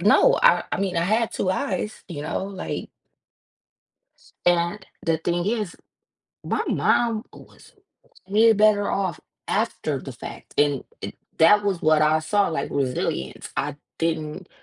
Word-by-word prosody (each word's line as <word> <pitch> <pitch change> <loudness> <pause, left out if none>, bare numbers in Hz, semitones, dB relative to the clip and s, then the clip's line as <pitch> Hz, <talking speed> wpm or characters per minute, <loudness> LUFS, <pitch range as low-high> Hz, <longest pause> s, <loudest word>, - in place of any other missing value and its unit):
no, 205 +4 +5
I 175 +1 +5
I - - 0
mean, 185 -3 -1
I 170 - +2
had 220 +4 +1
2 185 - 0
eyes, 215 0 -2
you 145 -4 -5
know, 155 - -2
like 195 -1 -5 1.6
And 175 +3 +2 0.2
the 165 -1 +1
thing 175 +2 -1
is, 215 -4 -1 0.7
my - - 0
mom 230 -2 +2
was - - -16 0.6
way 220 +3 +6
better 210 -1 +3
off 190 -4 -1 0.3
after - - -1
the - - -8
fact, - - -10
and, 145 -2 +3 0.2
eh, - - -4 0.3
that 205 +6 +6
was 195 -4 0
what 155 -1 +4
I 155 +1 +4
saw, 200 +6 +1
like, 150 -4 -3
resilience. 125 - -2
I - - -2 0.2
didn't, 160 +2 -2
175 Hz, 145 wpm, -24 LUFS, 155-205 Hz, 1.6 s, way